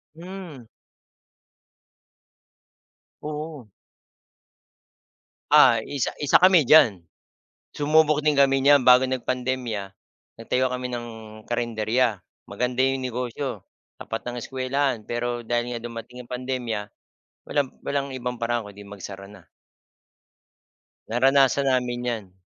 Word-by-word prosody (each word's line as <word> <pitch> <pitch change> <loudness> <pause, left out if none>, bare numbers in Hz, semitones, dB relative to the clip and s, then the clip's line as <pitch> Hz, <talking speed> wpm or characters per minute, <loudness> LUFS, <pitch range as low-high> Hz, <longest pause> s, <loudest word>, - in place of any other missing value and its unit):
Hmm. 175 -6 -9 2.6
Oo. 150 -5 -6 1.8
Ah, - - +6
isa 140 -4 -3
isa 145 - +5
kami 185 -2 +6
diyan. 120 - +5 0.7
Sumubok 150 0 +3
din 150 - +4
kami 135 -1 +3
nyan. 145 0 +7
Bago 125 0 +6
nagpandemya, 125 -5 -3 0.5
nagtayo 125 +3 0
kami 125 0 -3
ng 120 -1 -5 0.4
karenderiya. 115 0 0 0.3
Maganda 125 +1 -2
yung 135 0 +1
negosyo, 125 -1 -4 0.4
tapat 115 - -5
ng 120 0 -5
eskuwelahan. 130 -1 -2
Pero 120 +1 -3
dahil 120 +1 -1
nga 115 - -8
dumating 120 +1 -8
ang 120 - -13
pandemya, 125 -5 -3 0.6
walang 145 -2 0 0.2
walang 140 -1 -1
ibang 125 -1 -5
paraan 120 -1 -1
kundi 100 0 -12
magsara 100 -1 -9
na. 100 -3 -15 1.6
Naranasan 135 +3 +3
namin 125 -1 -1
yan. 110 -6 -4
125 Hz, 105 wpm, -24 LUFS, 120-135 Hz, 2.6 s, nyan